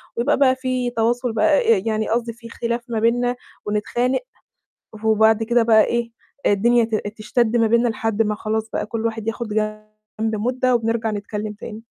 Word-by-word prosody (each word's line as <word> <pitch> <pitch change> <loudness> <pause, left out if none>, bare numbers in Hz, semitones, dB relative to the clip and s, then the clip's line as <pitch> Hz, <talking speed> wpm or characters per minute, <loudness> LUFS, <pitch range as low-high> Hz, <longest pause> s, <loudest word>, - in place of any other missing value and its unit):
وبيبقى 260 +5 +1
بقى 260 -2 +4
فيه 255 -1 -2
تواصل 240 +1 +1
بقى 230 0 +4
آآ 190 - -1
يعني 220 -1 -1
قصدي 230 0 -1
فيه 230 0 -13
خلاف 235 +1 -3
ما 225 - -1
بيننا 245 +2 +1 0.3
ونتخانق 240 +5 0 0.9
وبعد 220 0 +4
كده 235 +1 +2
بقى 220 -1 +5
إيه، 235 -1 -1 0.4
الدنيا 235 +4 +4
ت 225 - -3 0.2
تشتَد 235 +2 +1
ما 230 - +4
بيننا 235 +2 +3
لحد 225 -1 0
ما 210 -1 -1
خلاص 220 +1 -3
بقى - - -2
كل 230 +1 -2
واحد 225 -1 -3
ياخُد 230 0 -3
جنب 215 +1 -4
مُدّة 255 +2 +1
وبنرجع 225 -1 0
نتكلِّم 210 0 -4
تاني. 210 +1 -8
225 Hz, 170 wpm, -21 LUFS, 215-240 Hz, 0.9 s, بقى